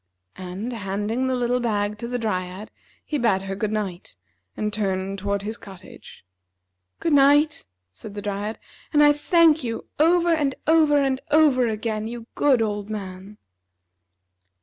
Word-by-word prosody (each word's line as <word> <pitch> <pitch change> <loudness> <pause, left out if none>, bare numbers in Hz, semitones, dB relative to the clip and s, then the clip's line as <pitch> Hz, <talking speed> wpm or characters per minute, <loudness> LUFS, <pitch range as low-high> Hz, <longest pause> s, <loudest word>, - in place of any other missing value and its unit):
And, 190 +7 -5
handing 210 +4 -2
the 260 - 0
little 245 0 0
bag 210 -3 -1
to 235 - -5
the 245 +1 -2
Dryad, 185 -2 -4 0.3
he 295 - -2
bade 200 -6 +2
her 195 0 -4
good 210 +1 -2
night, 195 - -4 0.4
and 210 -1 -2
turned 195 -1 -2
toward 200 0 -2
his 220 +2 -5
cottage. 190 - -13 0.7
"Good 330 - 0
night," 290 - +4 0.3
said 145 - -11
the 205 - -5
Dryad. 205 +2 -3 0.3
"And 295 -1 +5
I 295 0 +7
thank 315 0 +3
you 230 -2 -4
over, 340 +2 +4
and 285 -4 0
over, 310 -2 +4
and 270 -2 +1
over 290 -5 +4
again, 215 0 -3
you 235 0 -7
good 265 -6 +3
old 205 -1 -3
man!" 195 -1 -7
225 Hz, 150 wpm, -23 LUFS, 200-275 Hz, 0.7 s, I